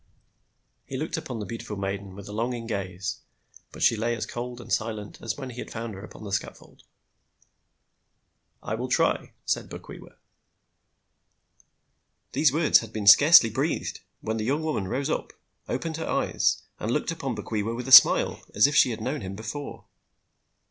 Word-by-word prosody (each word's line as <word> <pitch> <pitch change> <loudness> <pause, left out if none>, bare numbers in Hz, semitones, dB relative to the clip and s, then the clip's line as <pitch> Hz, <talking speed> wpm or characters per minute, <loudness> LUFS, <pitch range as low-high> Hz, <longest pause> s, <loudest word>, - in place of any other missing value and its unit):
He 130 - -5
looked 155 +4 -3
upon 125 - -5
the 105 - -5
beautiful 110 0 -6
maiden 100 -1 -4
with 100 0 -10
a - - -8
longing 115 +2 -3
gaze; 100 0 -4 0.5
but - - -5
she - - +5
lay 115 +2 -1
as 110 - -4
cold 120 0 -6
and 120 - -5
silent 110 -2 -3
as 115 0 -4
when 135 -2 -6
he 120 - -10
had - - -6
found 115 -1 -5
her 95 +1 -9
upon 110 - -11
the 100 - -7
scatfold. 100 - -5 1.8
"I - - -4
will 120 +3 -3
try," - - +1
said - - -1
Bokwewa. - - -11 2.2
These 150 -3 +3
words 155 +1 +4
had 115 -2 -9
been 110 -2 -4
scarcely 125 +3 +8
breathed, - - -2 0.2
when 110 0 -2
the 110 - -2
young 140 +7 0
woman 150 -12 -2
rose 135 +7 -2
up, - - -3 0.4
opened 160 -1 -3
her 160 - -4
eyes, - - +1 0.2
and 110 - -3
looked 150 +7 0
upon 135 -7 -4
Bokwewa 110 +1 -3
with 125 +2 -6
a - - -4
smile, - - +8
as 105 - +6
if 145 0 +1
she 130 - +6
had 115 - -5
known 140 +4 -3
him 95 0 -6
before. 115 +7 -7
115 Hz, 175 wpm, -26 LUFS, 105-130 Hz, 2.2 s, scarcely